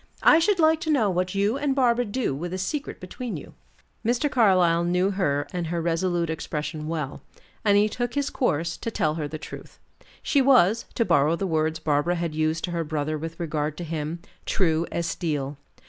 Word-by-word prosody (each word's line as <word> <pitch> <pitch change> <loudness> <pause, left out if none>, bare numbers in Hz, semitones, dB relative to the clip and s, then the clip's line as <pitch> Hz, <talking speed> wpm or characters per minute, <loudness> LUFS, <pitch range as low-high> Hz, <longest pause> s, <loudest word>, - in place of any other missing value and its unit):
I 320 - +7
should 370 +4 +2
like 320 -1 +4
to 325 - -3
know 235 -10 +3
what 180 +1 -1
you 205 +7 +1
and 285 -2 0
Barbara 245 -2 +3
do 225 - -1
with 170 +6 -5
a - - -3
secret 280 +11 -3
between 230 +6 -6
you." - - -11 0.5
Mr. 245 +5 +1
Carlyle 185 -7 +4
knew 180 +3 +1
her 145 -7 0
and 175 -2 -2
her 170 +1 -2
resolute 170 +1 0
expression 155 -1 -4
well, 155 -4 -4 0.4
and 205 -2 +4
he 210 +1 +4
took 245 +3 -3
his 285 0 0
course, 170 - 0
to - - -4
tell 155 -8 0
her 155 -2 -3
the 155 +2 -6
truth. 155 - -10 0.5
She 280 - +3
was, 235 -5 +4
to 230 - +2
borrow 160 -3 +3
the 195 - -2
words 160 -2 0
Barbara 155 +2 +1
had 170 -2 -2
used 155 +1 0
to 180 - -2
her 170 -1 -1
brother 155 0 -2
with 165 +2 -6
regard 155 -2 -2
to 175 - -5
him, 160 +1 -4 0.2
true 165 -3 +1
as 170 - -1
steel. 145 -5 -2
175 Hz, 200 wpm, -25 LUFS, 155-220 Hz, 0.5 s, I